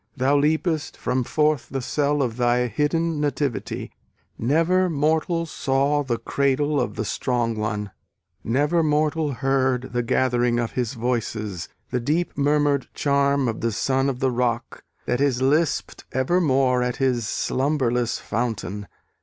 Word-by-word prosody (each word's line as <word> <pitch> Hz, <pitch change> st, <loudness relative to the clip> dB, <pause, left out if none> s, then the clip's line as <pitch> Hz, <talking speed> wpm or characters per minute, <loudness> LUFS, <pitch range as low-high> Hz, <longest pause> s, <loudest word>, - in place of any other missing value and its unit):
Thou 135 Hz, +3 st, +2 dB
leapest 155 Hz, +2 st, 0 dB
from 125 Hz, 0 st, -1 dB
forth 150 Hz, +2 st, +1 dB
The 135 Hz, -, -2 dB
cell 145 Hz, +2 st, 0 dB
of 115 Hz, -2 st, -3 dB
thy 125 Hz, 0 st, +2 dB
hidden 150 Hz, +6 st, 0 dB
nativity; 145 Hz, -3 st, -2 dB, 0.4 s
Never 165 Hz, +9 st, +2 dB
mortal 160 Hz, +2 st, +1 dB
saw 140 Hz, -1 st, +1 dB
The 125 Hz, -4 st, -1 dB
cradle 140 Hz, +2 st, +1 dB
of 125 Hz, -, -3 dB
the 110 Hz, -, -2 dB
strong 120 Hz, 0 st, -1 dB
one; 105 Hz, -2 st, -3 dB, 0.5 s
Never 145 Hz, +8 st, +2 dB
mortal 155 Hz, 0 st, +1 dB
heard 130 Hz, -1 st, 0 dB
The 120 Hz, -, +1 dB
gathering 120 Hz, 0 st, +1 dB
of 120 Hz, -1 st, -1 dB
his 125 Hz, 0 st, -2 dB
voices; 110 Hz, -6 st, -3 dB, 0.2 s
The 125 Hz, -, 0 dB
deep 155 Hz, +8 st, -1 dB
murmur'd 145 Hz, -1 st, +2 dB
charm 140 Hz, -1 st, +2 dB
of 115 Hz, -1 st, -3 dB
the 115 Hz, -, 0 dB
son 135 Hz, +6 st, +1 dB
of 130 Hz, -2 st, -4 dB
the 130 Hz, -1 st, +2 dB
rock, 120 Hz, -1 st, -2 dB, 0.2 s
That 125 Hz, -, 0 dB
is 135 Hz, -3 st, +2 dB
lisped 145 Hz, +5 st, 0 dB
evermore 130 Hz, -3 st, +2 dB
at 125 Hz, 0 st, -1 dB
his 125 Hz, -4 st, 0 dB
slumberless 125 Hz, -4 st, 0 dB
fountain. 105 Hz, -3 st, -3 dB
135 Hz, 140 wpm, -23 LUFS, 120-150 Hz, 0.5 s, Thou